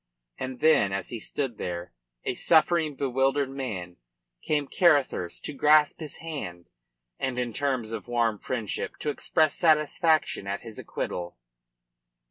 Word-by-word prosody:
And 130 Hz, -1 st, -5 dB
then, 155 Hz, -11 st, +5 dB
as 95 Hz, -1 st, -3 dB
he 120 Hz, -, -4 dB
stood 125 Hz, 0 st, -3 dB
there, 85 Hz, -2 st, -4 dB, 0.3 s
a -, -, -1 dB
suffering, 160 Hz, -2 st, +3 dB
bewildered 135 Hz, +1 st, +1 dB
man, 100 Hz, -11 st, -5 dB, 0.4 s
came 150 Hz, -2 st, 0 dB
Carruthers 145 Hz, -, +2 dB
to -, -, -5 dB
grasp 150 Hz, +1 st, +4 dB
his 155 Hz, -3 st, -6 dB
hand 115 Hz, -, -7 dB, 0.5 s
and 130 Hz, -2 st, -2 dB
in 120 Hz, -2 st, -2 dB
terms 130 Hz, -5 st, -1 dB
of 115 Hz, -, -5 dB
warm 115 Hz, -3 st, +1 dB
friendship 115 Hz, -3 st, -3 dB
to 150 Hz, -, 0 dB
express 155 Hz, +1 st, +2 dB
satisfaction 155 Hz, -, +2 dB
at 100 Hz, 0 st, -3 dB
his 115 Hz, -2 st, -9 dB
acquittal. 85 Hz, -4 st, -4 dB
130 Hz, 135 wpm, -27 LUFS, 110-150 Hz, 0.5 s, then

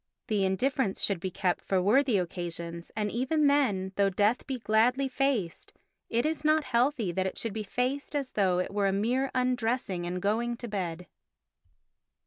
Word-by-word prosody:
The 210 Hz, -3 st, +1 dB
indifference 220 Hz, +2 st, 0 dB
should 200 Hz, -4 st, +2 dB
be 185 Hz, -, -3 dB
kept 180 Hz, 0 st, -1 dB
for 190 Hz, -, +1 dB
worthy 230 Hz, +5 st, +3 dB
occasions, 170 Hz, -1 st, -4 dB
and 210 Hz, -1 st, -1 dB
even 270 Hz, +6 st, +1 dB
then, 220 Hz, -10 st, +2 dB
though 200 Hz, -1 st, +4 dB
death 205 Hz, +5 st, +1 dB
be 265 Hz, -2 st, -2 dB
gladly 240 Hz, +4 st, +2 dB
faced, 260 Hz, -10 st, -1 dB, 0.4 s
it 235 Hz, +3 st, +1 dB
is 310 Hz, -1 st, -1 dB
not 310 Hz, 0 st, +3 dB
healthy 245 Hz, -5 st, +1 dB
that 185 Hz, +2 st, -1 dB
it -, -, -5 dB
should 225 Hz, -3 st, -2 dB
be 220 Hz, -, -3 dB
faced 255 Hz, +7 st, -2 dB
as 275 Hz, -3 st, -2 dB
though 190 Hz, -3 st, +2 dB
it 180 Hz, +2 st, -2 dB
were 200 Hz, -1 st, +1 dB
a -, -, +2 dB
mere 245 Hz, +7 st, 0 dB
undressing 240 Hz, -7 st, 0 dB
and 180 Hz, +1 st, -3 dB
going 230 Hz, +5 st, 0 dB
to 240 Hz, -, -6 dB
bed. 180 Hz, -5 st, -4 dB
220 Hz, 175 wpm, -29 LUFS, 190-255 Hz, 0.4 s, though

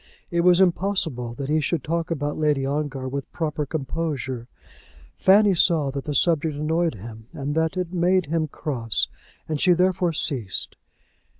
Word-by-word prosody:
It 170 Hz, 0 st, +2 dB
was 180 Hz, 0 st, +5 dB
impossible 175 Hz, -10 st, +1 dB
that 135 Hz, +1 st, -4 dB
he 155 Hz, +2 st, +2 dB
should 155 Hz, -1 st, -1 dB
talk 165 Hz, +1 st, -2 dB
about 145 Hz, -3 st, -2 dB
Lady 150 Hz, -3 st, +1 dB
Ongar 140 Hz, -2 st, -2 dB
with 140 Hz, +1 st, -5 dB
proper 150 Hz, -3 st, -2 dB
composure. 135 Hz, -4 st, -3 dB, 0.7 s
Fanny 200 Hz, +1 st, +5 dB
saw 160 Hz, -5 st, +3 dB
that 140 Hz, 0 st, -5 dB
the 150 Hz, -, -3 dB
subject 160 Hz, +1 st, +2 dB
annoyed 160 Hz, 0 st, 0 dB
him 110 Hz, +2 st, -10 dB
and 140 Hz, +1 st, -3 dB
that 160 Hz, +3 st, 0 dB
it 180 Hz, -1 st, -3 dB
made 180 Hz, +1 st, +2 dB
him 160 Hz, +1 st, -1 dB
cross, 120 Hz, -7 st, -2 dB, 0.4 s
and 155 Hz, -2 st, -2 dB
she 180 Hz, -, +5 dB
therefore 180 Hz, 0 st, +2 dB
ceased. 130 Hz, -, -1 dB
155 Hz, 160 wpm, -24 LUFS, 140-170 Hz, 0.7 s, was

